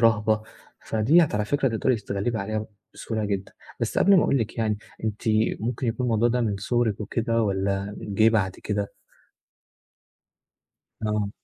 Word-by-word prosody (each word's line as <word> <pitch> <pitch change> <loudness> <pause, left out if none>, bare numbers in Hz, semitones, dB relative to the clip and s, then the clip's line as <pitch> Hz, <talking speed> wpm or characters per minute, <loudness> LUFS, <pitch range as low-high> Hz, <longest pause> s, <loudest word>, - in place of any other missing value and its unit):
رهبة، 110 -1 +3 0.4
فَديَّة 140 +10 +4
على 105 0 0
فكرة 135 +4 +1
تقدري 120 +2 +1
تتغلِّبي 105 +2 -2
عليها 110 +2 -3 0.3
بسهولة 110 -2 -3
جدًا، 100 -1 -3 0.3
بس - - 0
قبل 200 0 +6
ما 175 - +5
أقول 140 - +2
لِك 115 +1 -3
يعني، 110 -2 0 0.3
أنتِ 105 -1 -3 0.4
ممكن 120 +3 -2
يكون 120 +2 -1
الموضوع 115 0 +3
ده 125 +1 +1
من 105 -4 0
صُغرِك 110 +1 0
وكده 115 +2 0
والّا 100 0 -1
جِه 110 +1 +2
بعد 100 -5 +1
كده؟ 105 -1 -1 2.2
آه. 105 -1 0
110 Hz, 145 wpm, -25 LUFS, 105-115 Hz, 2.2 s, قبل